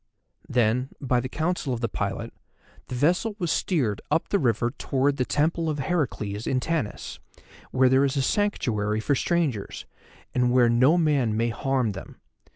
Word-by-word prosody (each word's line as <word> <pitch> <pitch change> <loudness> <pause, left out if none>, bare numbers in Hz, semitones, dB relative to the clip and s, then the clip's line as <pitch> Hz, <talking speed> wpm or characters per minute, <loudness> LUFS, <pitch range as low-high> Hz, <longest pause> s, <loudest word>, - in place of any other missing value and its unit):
Then, 125 +2 +1
by 125 -3 +1
the 130 +1 -4
counsel 155 -3 -1
of - - -5
the 115 - +1
pilot, - - -4 0.5
the 125 - -5
vessel 180 - +1
was 175 -5 -1
steered 125 - 0
up 165 - 0
the 200 - +2
river 120 -2 +1
towards 140 +1 0
the 125 - +2
Temple 160 +4 0
of 150 - -2
Heracles 120 - -2
in 130 - +1
Tanis, 155 -6 -3 0.5
where 130 0 +3
there 130 +2 +4
is 140 0 0
a 135 - +2
sanctuary 110 - 0
for 125 +6 +1
strangers, 140 - -1 0.5
and 125 -1 +2
where 125 -1 +5
no 130 +8 +4
man 140 -10 +2
may 115 +1 +1
harm 125 0 0
them. 95 -1 -10
130 Hz, 165 wpm, -25 LUFS, 120-155 Hz, 0.5 s, where